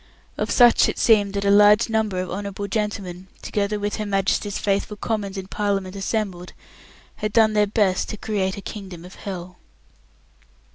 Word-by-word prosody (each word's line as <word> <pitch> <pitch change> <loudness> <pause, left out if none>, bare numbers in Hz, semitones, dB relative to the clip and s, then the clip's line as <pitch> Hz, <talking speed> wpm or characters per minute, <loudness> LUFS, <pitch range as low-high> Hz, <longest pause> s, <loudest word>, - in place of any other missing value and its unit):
Of - - -2
such 240 -2 +5
it - - -4
seemed 205 -3 +3
that 200 0 -1
a 200 - +4
large 210 +2 +6
number 220 -4 0
of 185 -1 -4
Honourable 200 +1 -4
Gentlemen, 195 -3 -3 0.2
together 205 0 -1
with 205 0 -2
Her 215 - -3
Majesty's 195 +1 0
faithful 200 +1 -1
commons 205 -3 -3
in 190 - -5
Parliament 195 -1 -2
assembled, 195 -3 -3 0.6
had 215 - -3
done 220 0 +4
their 210 -1 +3
best 200 -3 +1
to 215 - -5
create 200 -3 -2
a - - -6
Kingdom 190 -4 -8
of 180 - -12
Hell. 180 -2 -7
200 Hz, 165 wpm, -23 LUFS, 190-210 Hz, 0.6 s, large